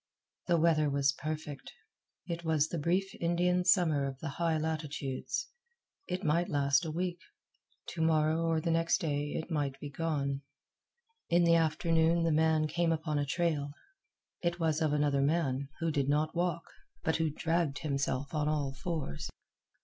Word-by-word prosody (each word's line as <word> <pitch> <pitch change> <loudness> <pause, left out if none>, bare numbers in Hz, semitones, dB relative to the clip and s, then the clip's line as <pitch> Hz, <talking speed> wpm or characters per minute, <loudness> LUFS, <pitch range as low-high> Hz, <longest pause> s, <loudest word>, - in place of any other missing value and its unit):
The 175 -1 +3
weather 155 -2 +3
was 140 0 +2
perfect. 150 -1 -6 0.5
It 170 -1 -4
was 160 -2 +2
the 170 - -3
brief 185 +5 0
Indian 175 +1 +2
Summer 170 -6 +3
of 135 -1 -6
the 150 +2 -5
high 165 +2 0
latitudes. 155 - -3 0.6
It 185 +2 -3
might 170 +2 +1
last 140 +2 +2
a - - -3
week. 175 +2 -2 0.7
To 165 - -4
morrow 160 0 +3
or 165 -1 +2
next 165 0 +2
day 145 -4 -2
it 160 - -4
might 145 -3 -1
he 145 0 -7
gone. 140 -3 -1 0.9
In 175 +1 +4
the 170 0 +5
afternoon 165 +1 +3
the 165 - +2
man 160 0 +3
came 170 +1 +1
upon 155 -2 -1
a 145 - -1
trail. 150 -2 0 0.7
It 175 0 -1
was 160 -1 +1
of 155 -2 +2
another 145 -2 +2
man, 140 -2 0
who 165 -1 +1
did 140 -2 0
not 150 +3 +1
walk, 170 -1 0 0.4
but 160 - +1
who 160 -1 +1
dragged 165 -1 0
himself 140 -1 -2
on 150 -1 +1
all 145 -3 -1
fours. 150 - -4
160 Hz, 160 wpm, -31 LUFS, 145-170 Hz, 0.9 s, the